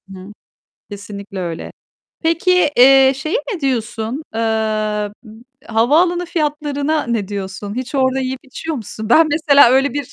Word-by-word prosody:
Hıı. 190 +1 -11 0.6
Kesinlikle 200 -1 -8
öyle. 170 -2 -6 0.5
Peki, 335 0 +2
eee, 265 +1 +7
şeye 310 - -2 0.2
ne 365 - -5
diyorsun? 240 0 -2
Eee, 225 - -2 0.8
m 220 -4 -14 0.4
havaalanı 325 +11 +2
fiyatlarına 300 -1 -2
ne 225 -5 -2
diyorsun? 200 0 -6
Hiç 255 +3 -6
orada 260 -1 +1
yiyip 260 0 -4
içiyor 295 +4 -6
musun? 220 -2 -7
Ben, 315 +7 +5
mesela, 290 -4 +5
öyle 265 +1 +2
bir, 285 -3 -5
265 Hz, 135 wpm, -18 LUFS, 220-300 Hz, 0.8 s, eee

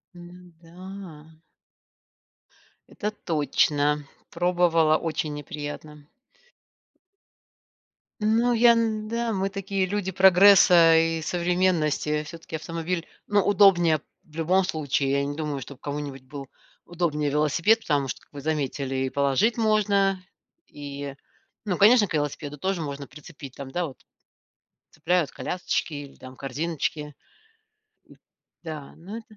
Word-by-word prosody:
М, 175 0 -14
да. 170 -2 -11 1.5
Это 210 - -3
точно, 150 -5 0 0.2
пробовала- 170 -2 +2
очень 155 -2 -3
неприятно. 145 0 -8 2.2
Ну 225 +3 +2
я, 235 0 +6
да, 225 +1 -1
мы 195 0 -1
такие 195 -1 -2
люди 190 0 -2
прогресса 185 -2 +7
и 165 0 +1
современности, 170 -3 0
все-таки 165 +1 -9
автомобиль, 165 +2 -4 0.2
ну 205 -1 +3
удобнее 180 -6 +5 0.2
в 155 - -21
любом 180 +4 +2
случае. 145 -5 -1
Я 140 0 +1
не 145 +1 -4
думаю, 150 -2 -3
что 135 +2 -9
кому-нибудь 145 -1 -6
был 135 +1 -9 0.4
удобнее 160 -4 -1
велосипед. 155 +9 +2
Потому 145 -8 0
что, - - -6
вы 145 - -9
заметили 140 -3 -2
и - - -2
положить 140 - +1
можно, 200 -4 +2 0.4
и. 140 -1 -7 0.5
Ну 185 -4 -1
конечно 215 +1 +6
к 185 - -8
велосипеду 145 -1 -3
тоже 190 +1 -1
можно 140 -1 -6
прицепить, 150 -3 -12
там, 135 -1 -8
да, 175 +4 -1
вот 135 - -13 0.9
цепляют 160 -1 0
колясочки 180 -2 -3
или 145 -1 -8
там 130 0 -12
корзиночки. 150 +2 -4 0.9
Н - - -17 0.5
Да, 155 -4 -7
но 195 +7 -8
это. 220 -1 -15
165 Hz, 120 wpm, -25 LUFS, 145-190 Hz, 2.2 s, прогресса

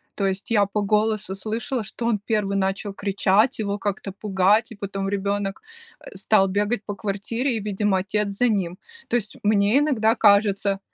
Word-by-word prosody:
То 195 - 0
есть 195 +5 -3
я 205 -3 +4
по 205 +1 -2
голосу 210 -1 0
слышала, 225 +4 -3
что 225 +2 -6
он 230 -3 +1
1 205 -1 -1
начал 195 +1 -2
кричать, 200 +4 +1
его 205 -1 -2
как-то 200 -1 -3
пугать, 200 +3 +1
и - - -8
потом 195 -1 -4
ребенок, 200 0 -2 0.4
э, - - -12
стал 195 0 +3
бегать 205 +3 -1
по 205 - -4
квартире, 225 +6 -2
и, - - -2
видимо, 205 -1 0
отец 205 +2 -1
за 245 +4 +2
ним. 185 -4 -1 0.3
То - - -1
есть 215 -3 -2
мне 205 +4 +3
иногда 230 -7 +2
кажется 200 -2 +3
205 Hz, 175 wpm, -23 LUFS, 195-220 Hz, 0.4 s, я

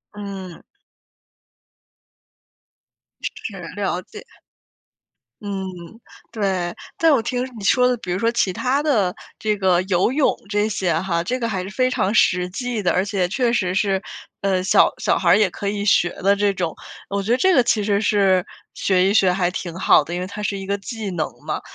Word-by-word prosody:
嗯。 195 -4 -7 2.6
是， - - -6 0.2
了 - - -2
解。 - - -12 1.2
嗯， 200 -2 -4 0.7
对， 190 -5 -1 0.2
但 330 -5 +4
我 245 - +3
听 250 0 -2
你 205 - -8
说 250 +5 +4
的， 250 - +2
比 185 -6 -6
如 185 - -1
说 230 - +2
其 235 -5 +1
他 265 +9 0
的 215 -11 +1 0.2
这 215 -1 0
个 185 -3 +2
游 185 +4 +1
泳 285 0 +2
这 210 0 +1
些 190 -5 0
哈， 170 -2 -1
这 255 +6 -2
个 230 - -1
还 190 -5 -2
是 190 - -7
非 255 +4 +1
常 205 -4 0
实 180 -4 +3
际 235 +1 -3
的， 175 - +2
而 185 +2 +1
且 195 -3 0
确 240 +2 +1
实 185 -6 0
是， 195 -1 +1 0.4
呃， 190 -2 +1
小 190 - +4
小 - - +1
孩 - - +1
儿 - - +7
也 210 -3 +3
可 200 - -4
以 205 0 -3
学 175 -4 +4
的 200 +2 +4
这 205 0 +1
种。 175 -4 -3 0.3
我 200 0 -2
觉 225 - -2
得 245 - +4
这 375 +6 +3
个 255 -7 +5
其 220 -3 +1
实 205 0 +1
是 195 -4 +3 0.3
学 190 0 +2
一 - - +1
学 190 -4 +4
还 180 -1 +1
挺 175 -2 -5
好 - - +5
的， 170 +4 -7
因 175 - -2
为 185 - -4
它 210 +1 -7
是 200 -1 -1
一 195 - -6
个 200 +1 -1
技 215 0 -6
能 160 -3 -1 0.2
嘛。 - - -2
200 Hz, 205 characters per minute, -21 LUFS, 185-220 Hz, 2.6 s, 儿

